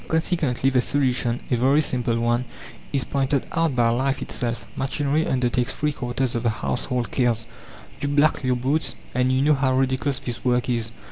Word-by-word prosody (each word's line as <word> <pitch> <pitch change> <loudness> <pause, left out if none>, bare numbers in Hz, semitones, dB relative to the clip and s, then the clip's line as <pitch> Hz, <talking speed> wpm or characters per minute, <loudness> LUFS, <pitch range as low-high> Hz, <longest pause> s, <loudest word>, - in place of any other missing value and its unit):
Consequently, 160 -6 +1
the 125 -1 +3
solution, 125 -3 +1
a - - +4
very 135 +5 +3
simple 120 -5 0
one, 120 +1 +1 0.5
is 140 -3 +1
pointed 135 +1 0
out 165 -5 +1
by 120 -2 +3
life 130 +3 0
itself. 120 -1 -3
Machinery 145 +3 0
undertakes 125 0 +1
three 150 0 0
quarters 125 -1 -2
of 115 - -1
the 120 - +1
household 125 +2 -2
cares. 120 -3 +1 0.5
You 145 - -2
black 145 +1 +2
your 130 -1 +2
boots, 135 +6 0 0.2
and 125 +1 +2
you 130 +1 +2
know 150 +1 +5
how 135 -2 +1
ridiculous 135 +1 +1
this 120 -4 -5
work 125 -1 +1
is. 115 -2 -1
130 Hz, 180 wpm, -23 LUFS, 120-140 Hz, 0.5 s, know